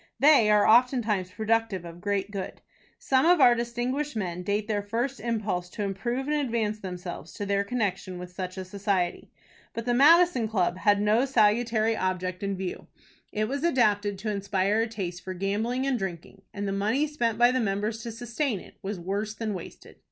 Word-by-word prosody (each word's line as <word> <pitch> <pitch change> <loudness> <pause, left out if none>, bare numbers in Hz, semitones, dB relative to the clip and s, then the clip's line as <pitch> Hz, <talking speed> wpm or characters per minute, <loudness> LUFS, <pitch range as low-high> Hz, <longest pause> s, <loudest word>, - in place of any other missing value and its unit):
They 280 -7 +6
are 210 -1 +5
oftentimes 225 -5 +3
productive 220 -2 -1
of 170 +1 -10
great 200 0 -1
good. 195 -2 -5 0.4
Some 265 -1 +2
of 350 0 +5
our 245 -3 +7
distinguished 240 +4 -2
men 180 -4 -3
date 205 +3 -1
their 210 -2 0
first 235 +6 -2
impulse 210 -6 -2
to 205 - -5
improve 235 +7 -2
and 300 0 +1
advance 230 -6 -1
themselves 180 -4 -7
to 205 - -5
their 200 0 +1
connection 195 -5 -2
with 180 0 -8
such 185 +1 -5
a 190 - -5
society. 190 -2 -2 0.5
But 230 - -4
the 245 - +1
Madison 305 -1 +5
Club 185 -4 0
had 205 0 +3
no 215 +5 +3
salutary 225 -2 +2
object 185 -2 -2
in 200 -1 -2
view. 185 -1 -5 0.4
It 215 0 -1
was 280 +4 -3
adapted 210 - +2
to 215 +2 -3
inspire 200 +1 0
a 230 - 0
taste 185 -6 -5
for 185 0 -5
gambling 215 +7 -1
and 265 -3 0
drinking, 190 +1 -6
and 205 0 -4
the - - -1
money 215 +9 +1
spent 240 -7 -1
by 240 +1 +5
the 255 - +1
members 215 +1 -1
to 235 - -5
sustain 240 0 -2
it - - -15
was 200 0 -4
worse 200 +4 -3
than 220 -2 -3
wasted. 180 - -10
210 Hz, 190 wpm, -27 LUFS, 195-240 Hz, 0.5 s, our